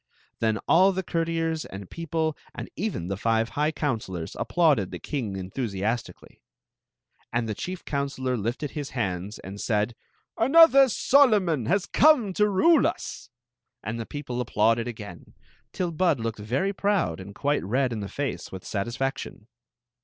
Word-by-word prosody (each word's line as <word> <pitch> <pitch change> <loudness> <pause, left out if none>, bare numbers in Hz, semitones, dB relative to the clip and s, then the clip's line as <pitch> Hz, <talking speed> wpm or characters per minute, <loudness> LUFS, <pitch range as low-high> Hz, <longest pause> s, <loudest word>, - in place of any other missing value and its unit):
Then 110 -1 +1
all 185 +4 +6
the 190 0 -2
courtiers 165 -1 -1
and 95 -1 -9
people 160 - -2
— - - -26
and - - -7
even 190 - -3
the 100 - -2
five 115 +2 +1
high 150 +6 0
counselors 110 - -3
— - - -9
applauded 130 - +2
the 90 - -6
king 115 - -4
enthusi 95 +1 -4
astically; 115 +2 -4 0.9
and 120 -1 0
the 110 - -2
chief 180 - -6
counselor 140 -3 -2
lifted 120 +6 -3
up - - -20
his 145 -2 -4
hands 95 -1 -2
and 100 +2 -8
said: 105 0 0 0.2
" - - -45
Another 275 +1 +7
Solomon 210 - +3
has 195 +5 +2
come 275 -10 +4
to 210 +2 +3
rule 300 - +5
us! 135 - -5 0.3
" - - -60
And 110 +3 -4
the 115 - -5
people 125 -4 -4
applauded 115 0 +2
again, 105 -7 -9 0.4
till 180 -2 -2
Bud 165 -4 +2
looked 115 -1 -3
very 130 - -1
proud 190 - 0
and 100 +2 -9
quite 145 +1 0
red 125 +5 0
in 110 - -3
the 100 -1 -5
face 135 -11 -4
with 95 -1 -8
satisfection. 120 +2 -3
130 Hz, 170 wpm, -26 LUFS, 105-170 Hz, 0.9 s, Another